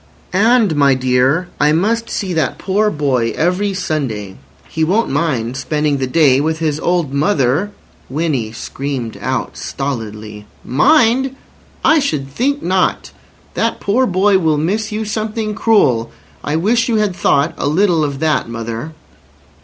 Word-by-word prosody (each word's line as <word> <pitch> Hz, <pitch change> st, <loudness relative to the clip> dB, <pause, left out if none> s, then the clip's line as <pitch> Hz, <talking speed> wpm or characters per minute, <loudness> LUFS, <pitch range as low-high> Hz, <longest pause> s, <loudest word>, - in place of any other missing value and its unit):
"And, 220 Hz, -2 st, +3 dB
my 140 Hz, -2 st, +4 dB
dear, 130 Hz, +6 st, +1 dB
I 150 Hz, +1 st, +3 dB
must 225 Hz, +7 st, 0 dB
see 190 Hz, -4 st, -3 dB
that 160 Hz, -2 st, -1 dB
poor 205 Hz, +3 st, +1 dB
boy 135 Hz, -, 0 dB
every 185 Hz, +4 st, 0 dB
Sunday. 120 Hz, -, -3 dB, 0.3 s
He 160 Hz, -, -2 dB
won't 200 Hz, +8 st, +1 dB
mind 125 Hz, -7 st, -1 dB
spending 150 Hz, +1 st, 0 dB
the 130 Hz, -1 st, -2 dB
day 140 Hz, -1 st, +4 dB
with 160 Hz, +1 st, -1 dB
his 155 Hz, -2 st, -1 dB
old 170 Hz, -6 st, 0 dB
mother—" 145 Hz, +2 st, +1 dB, 0.4 s
Winnie 135 Hz, -6 st, -1 dB
screamed 125 Hz, 0 st, -5 dB
out -, -, -2 dB
stolidly: 110 Hz, -6 st, -5 dB, 0.2 s
"Mind! 265 Hz, -, +3 dB, 0.5 s
I 320 Hz, 0 st, +5 dB
should 145 Hz, -, -2 dB
think 280 Hz, -, -1 dB
not. 185 Hz, +1 st, 0 dB, 0.4 s
That -, -, -1 dB
poor 250 Hz, +6 st, +1 dB
boy 190 Hz, +1 st, +3 dB
will 160 Hz, -4 st, +1 dB
miss 210 Hz, +8 st, -1 dB
you 215 Hz, +1 st, -3 dB
something 215 Hz, 0 st, -3 dB
cruel. 165 Hz, -, +2 dB, 0.3 s
I 150 Hz, -, -2 dB
wish 230 Hz, +8 st, +1 dB
you 230 Hz, -, +1 dB
had 210 Hz, -4 st, +1 dB
thought 145 Hz, -2 st, +1 dB
a -, -, -2 dB
little 170 Hz, +1 st, +2 dB
of 140 Hz, -2 st, -2 dB
that, 155 Hz, -6 st, +1 dB
mother." 115 Hz, +6 st, -5 dB
160 Hz, 145 wpm, -16 LUFS, 135-205 Hz, 0.5 s, I